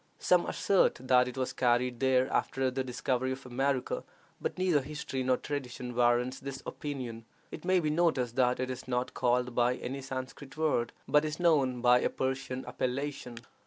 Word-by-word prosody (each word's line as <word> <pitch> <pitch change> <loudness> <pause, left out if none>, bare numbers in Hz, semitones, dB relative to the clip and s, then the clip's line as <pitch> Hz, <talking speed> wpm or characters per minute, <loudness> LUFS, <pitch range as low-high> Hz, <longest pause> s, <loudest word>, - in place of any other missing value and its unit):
Some 180 -1 +3
assert 195 -2 +3
that 125 0 +4
it 125 - -7
was 130 -1 -1
carried 120 0 +1
there 130 -1 +3
after 135 -1 +1
the 130 +1 -2
discovery 130 +1 -1
of 130 0 -10
America, 130 +1 -1 0.4
but - - -3
neither 180 -5 +2
history 135 -1 -4
nor 130 0 +2
tradition 125 -4 -5
warrants 120 +1 +2
this 135 0 -7
opinion. 125 -6 -5 0.3
It - - -8
may 185 0 +4
be 155 -3 0
noticed 150 -8 +1
that 125 -1 +3
it 130 0 -1
is 130 0 -7
not 125 0 -1
called 125 0 +1
by 120 +1 +2
any 135 +3 -5
Sanscrit 130 +2 -7
word, 150 -7 +1 0.2
but 150 0 +4
is 155 +1 -3
known 140 -8 +3
by 125 0 +6
a - - +1
Persian 130 -1 -3
appellation. 130 -1 -3
130 Hz, 175 wpm, -30 LUFS, 125-140 Hz, 0.4 s, by